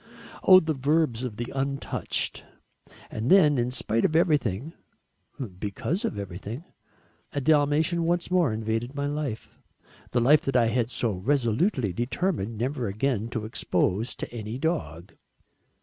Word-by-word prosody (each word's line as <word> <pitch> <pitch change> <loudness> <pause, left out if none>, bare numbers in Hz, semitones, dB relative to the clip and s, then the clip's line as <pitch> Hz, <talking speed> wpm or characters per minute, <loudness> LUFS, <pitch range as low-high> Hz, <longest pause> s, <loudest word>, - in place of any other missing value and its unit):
Oh 185 -1 +8
the 160 -2 -1
verbs 140 -3 +1
of 115 -5 -5
the 120 +1 -4
untouched. 135 0 -2 0.7
And 110 +4 -3
then, 150 -8 +6
in 120 +1 +1
spite 115 -2 0
of 155 - +1
everything, 150 - +1 0.9
because 110 - -3
of - - -3
everything, 100 - -6 0.7
a - - 0
Dalmatian 150 +3 +2
once 175 +1 0
more 175 -8 +3
invaded 110 +4 -2
my 140 0 -1
life 145 -6 -4 0.5
the 120 - +1
life 145 +6 +5
that 135 - -1
I 115 -2 +4
had 120 0 0
so 120 -2 -1
resolutely 120 - 0
determined 120 - -2
never 125 +1 -2
again 110 +2 -1
to 110 -2 -4
expose 110 0 0
to - - -7
any 110 0 -5
dog. 100 - -3
125 Hz, 140 wpm, -26 LUFS, 110-150 Hz, 0.9 s, Oh